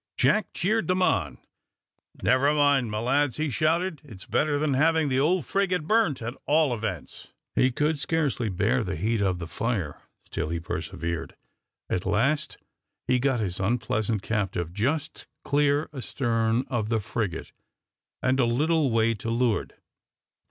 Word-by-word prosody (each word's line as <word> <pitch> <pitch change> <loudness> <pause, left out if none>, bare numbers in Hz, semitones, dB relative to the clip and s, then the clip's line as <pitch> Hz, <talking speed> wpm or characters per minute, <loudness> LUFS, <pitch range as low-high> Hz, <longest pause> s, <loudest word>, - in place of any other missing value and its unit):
Jack 175 +10 +3
cheered 215 +5 +1
them 185 0 +2
on: 85 - +1 0.9
"Never 135 +3 +4
mind, 145 -5 +3
my 105 - -3
lads," 130 +4 +1
he 155 -2 -1
shouted; 160 +2 0
"it's 110 -10 -11
better 150 -1 +1
than 145 -1 +1
having 160 +2 +3
the 130 0 +1
old 165 +3 +2
frigate 185 -4 0
burnt, 210 - +2
at 120 +2 -3
all 150 -3 +3
events." 105 -7 -5 0.3
He 130 - +4
could 150 +4 0
scarcely 145 -7 0
bear 105 +5 +1
the 95 -3 -3
heat 105 +6 0
of 95 -3 +1
the 85 - -5
fire; 85 - -3 0.2
still - - -3
he 85 0 -2
persevered. 85 0 -4 0.5
At 90 +1 -2
last 135 +9 +1 0.5
he 125 0 +3
got 130 -2 +1
his 95 -3 -2
unpleasant 110 0 0
captive 95 -6 -2
just 140 - -2 0.2
clear 145 +1 +2
astern 115 -3 0
of 115 -5 -2
the 115 -1 +1
frigate, 105 -3 -3 0.7
and 130 +1 +2
a 125 - +4
little 150 +5 +2
way 115 0 +2
to 115 +1 -5
leeward. 115 -1 0
125 Hz, 150 wpm, -26 LUFS, 105-150 Hz, 0.9 s, Never